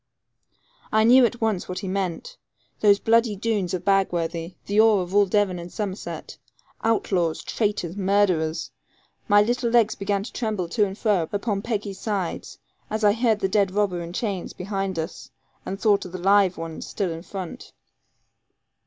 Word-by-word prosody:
I 220 0 +4
knew 245 +2 +7
at 240 +1 -9
once 215 -6 -1
what 180 - -4
he 195 - -5
meant 195 - -3 0.4
those 205 -1 +5
bloody 230 0 +2
Doones 200 -3 -1
of 175 -1 -6
Bagworthy, 175 -3 0
the 205 +2 +3
awe 220 -2 +5
of 180 0 -4
all 205 0 +5
Devon 190 -2 +1
and 170 +1 -8
Somerset, 205 -2 -5 0.4
outlaws, 185 -7 0
traitors, 205 -5 -2
murderers. 190 -5 +1 0.6
My 205 0 +6
little 240 +2 0
legs 230 -2 +4
began 200 0 -1
to - - -9
tremble 215 -7 -2
to 210 +3 +2
and 195 +1 -8
fro 200 -9 +1
upon 205 0 -1
Peggy's 205 -3 -3
sides, 200 -6 -3 0.3
as 215 0 -3
I 205 -1 +5
heard 225 -2 +1
the - - +2
dead 200 0 +2
robber 190 -2 0
in 170 0 -6
chains 195 -1 -3
behind 195 -1 -3
us, 160 +2 -5 0.4
and 195 +1 -4
thought 210 -2 +3
of 180 - -9
the - - -3
live 195 0 +3
ones 165 -1 -6
still 195 -5 -2
in 165 0 -6
front. 185 -1 -8
200 Hz, 170 wpm, -24 LUFS, 180-215 Hz, 0.6 s, knew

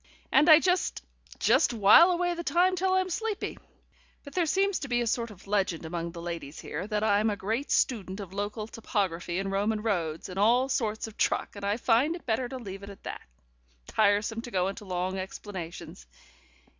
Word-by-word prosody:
And 285 +5 +5
I 310 0 +10
just 365 +1 0 0.3
just - - +3
while 220 - +7
away 350 0 +1
the 340 0 -5
time 360 +2 +3
till 375 +1 +1
I'm 375 -1 +1
sleepy. 435 +2 -3 0.6
But 285 - -11
there 350 -3 +1
seems 390 +3 +1
to 280 - -5
be 240 -2 +1
a - - 0
sort 235 0 -1
of 200 -4 -14
legend 195 -5 -1
among 170 +1 -4
the 170 0 -8
ladies 165 -4 -6
here, 195 - -5
that 210 -1 -1
I'm 215 0 +3
a 205 - -1
great 225 +8 -3
student 200 -5 0
of 190 -3 -8
local 205 +2 -3
topography 190 -6 -2
and 195 0 -2
Roman 210 +2 0
roads, 165 -8 -1
and 185 +1 -6
all 245 +6 +4
sorts 220 -4 -1
of 220 -2 -11
truck, - - 0
and 200 - -9
I 200 +2 0
find 250 +7 +2
it 345 - -11
better 240 +1 -1
to 260 - -5
leave 195 -5 -8
it 200 - -9
at 200 - -12
that. - - -6 0.6
Tiresome 215 - +1
to 240 - -8
go 185 -3 0
into 205 +2 -8
long 185 0 -2
explanations. 185 - -8
215 Hz, 200 wpm, -28 LUFS, 190-260 Hz, 0.6 s, I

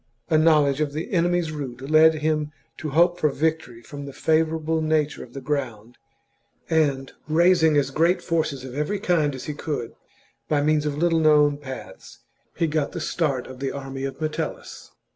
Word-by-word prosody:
A 155 - +5
knowledge 150 -3 +3
of 145 -2 -1
the 155 +3 -5
enemy's 175 -2 +1
route 135 -6 -6
led 160 +1 +6
him 155 -1 -1 0.3
to 155 - -4
hope 175 +4 +3
for 150 - +3
victory 145 -6 -2
from 145 +3 -8
the 140 - -8
favourable 160 +1 0
nature 155 -1 0
of - - -15
the 135 - -6
ground, 120 -5 -4 0.7
and, 140 -4 +1 0.2
raising 160 -1 +4
as 140 -1 +1
great 165 +6 +2
forces 155 -6 -1
of 130 - -8
every 150 +9 -1
kind 160 -7 +1
as 130 - -7
he 150 - -4
could, 145 -5 -4 0.6
by 150 - +2
means 150 0 +2
of 145 -1 -3
little 165 0 +2
known 150 -2 +4
paths 135 -3 -10 0.4
he 165 - +1
got 155 -2 -1
the 175 - -4
start 145 -6 -1
of 130 -1 -11
the 135 0 -2
army 135 -1 -6
of 135 -1 -5
Metellus. 155 0 -5
150 Hz, 180 wpm, -24 LUFS, 140-160 Hz, 0.7 s, led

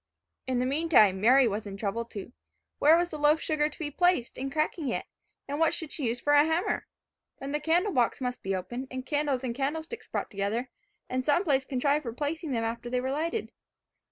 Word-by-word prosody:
In 255 -1 0
the 250 - +1
meantime, 265 - +4
Mary 255 +3 +6
was 210 0 -3
in 195 -1 -7
trouble 220 +3 -2
too. 225 +1 -8 0.5
Where 310 +3 +7
was 350 0 0
the 305 - -6
loaf 295 +2 +4
sugar 305 -2 0
to - - -12
be 295 -3 -4
placed 355 -6 +2
in 270 +1 -4
cracking 305 0 -1
it, - - -2 0.4
and 285 +2 -3
what 325 -1 +3
should 320 -3 -6
she 280 -6 -2
use 235 +2 -1
for 290 +4 +1
a 290 0 +7
hammer? 320 +3 0 0.5
Then 275 +1 -6
the 295 - 0
candle 345 +6 +2
box 245 -3 +2
must 250 -1 -3
be 195 0 -1
opened, 240 +8 -5
and 260 0 -6
candles 290 -3 0
and 245 -2 -2
candle 280 +5 -2
sticks 465 +8 -9
brought - - -3
together, 215 +5 -2 0.4
and 255 0 -1
some 295 +7 +3
place 275 -6 +2
contrived 280 +3 +1
for 235 -6 -5
placing 305 +5 -3
them 230 -3 0
after 235 +1 -3
they 250 0 0
were 260 +1 -2
lighted. 335 +9 -2
270 Hz, 220 wpm, -28 LUFS, 240-310 Hz, 0.5 s, Where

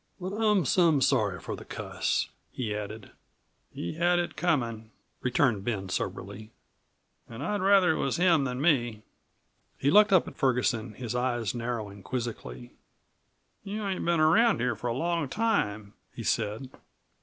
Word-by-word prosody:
"But 185 +1 -5
I'm 210 -5 +2
some 165 -1 +4
sorry 105 -9 +2
for - - -5
the - - -10
cuss," - - -2 0.2
he 110 -5 -3
added. 105 0 -7 0.6
"He 85 - -5
had 175 +1 +3
it 175 0 -2
comin'," 120 -10 -1 0.3
returned 125 -5 +1
Ben 100 -4 -3
soberly. 100 +3 -4 0.8
"An' 115 +4 -7
I'd 205 +4 -1
rather 195 -2 +5
it - - -1
was 135 - 0
him 170 -4 +4
than 125 -1 -3
me." 120 -8 +1 0.7
He 140 - +1
looked 210 +1 +6
up 185 -3 +4
at - - -9
Ferguson, 125 -4 0
his 120 -1 -5
eyes 120 -4 -1
narrowing 115 -4 -4
quizzically. 95 - -5 0.9
"You 205 +1 -4
ain't 190 -2 -2
been 170 -1 +2
around 205 +9 +4
here 120 0 0
for 110 - -5
a 120 - 0
long 165 0 -1
time," 110 - -1 0.2
he - - -6
said. 115 +6 -1
125 Hz, 155 wpm, -28 LUFS, 110-175 Hz, 0.9 s, looked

